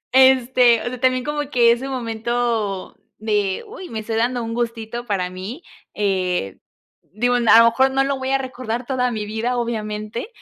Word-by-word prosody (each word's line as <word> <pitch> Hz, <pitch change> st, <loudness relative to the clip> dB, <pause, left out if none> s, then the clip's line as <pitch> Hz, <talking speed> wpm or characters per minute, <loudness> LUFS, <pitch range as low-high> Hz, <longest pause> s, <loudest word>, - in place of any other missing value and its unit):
este, 255 Hz, -2 st, +5 dB
o -, -, -8 dB
sea, 250 Hz, 0 st, -5 dB
también 255 Hz, -1 st, +2 dB
como 295 Hz, -1 st, -3 dB
que 235 Hz, -4 st, +5 dB
ese 255 Hz, +3 st, -3 dB
momento 230 Hz, -4 st, -2 dB, 0.2 s
de: 210 Hz, -, -1 dB
"Uy, 395 Hz, -5 st, -9 dB
me 225 Hz, -, -4 dB
estoy 220 Hz, +1 st, -4 dB
dando 240 Hz, +1 st, 0 dB
un 230 Hz, 0 st, -4 dB
gustito 235 Hz, 0 st, -3 dB
para 190 Hz, -4 st, -1 dB
mí", 195 Hz, -, -7 dB, 0.3 s
eh, 185 Hz, -, -1 dB, 0.5 s
digo, 245 Hz, +4 st, +1 dB
a 245 Hz, -, +2 dB, 0.2 s
lo 230 Hz, -, +8 dB
mejor 265 Hz, +3 st, +3 dB
no 270 Hz, 0 st, +2 dB
lo 275 Hz, 0 st, -1 dB
voy 260 Hz, 0 st, -3 dB
a 270 Hz, -, +3 dB
recordar 255 Hz, -2 st, -5 dB
toda 250 Hz, -2 st, 0 dB
mi 215 Hz, -2 st, -4 dB
vida, 230 Hz, +4 st, -2 dB
obviamente, 215 Hz, -, -4 dB
235 Hz, 180 wpm, -21 LUFS, 215-255 Hz, 0.5 s, lo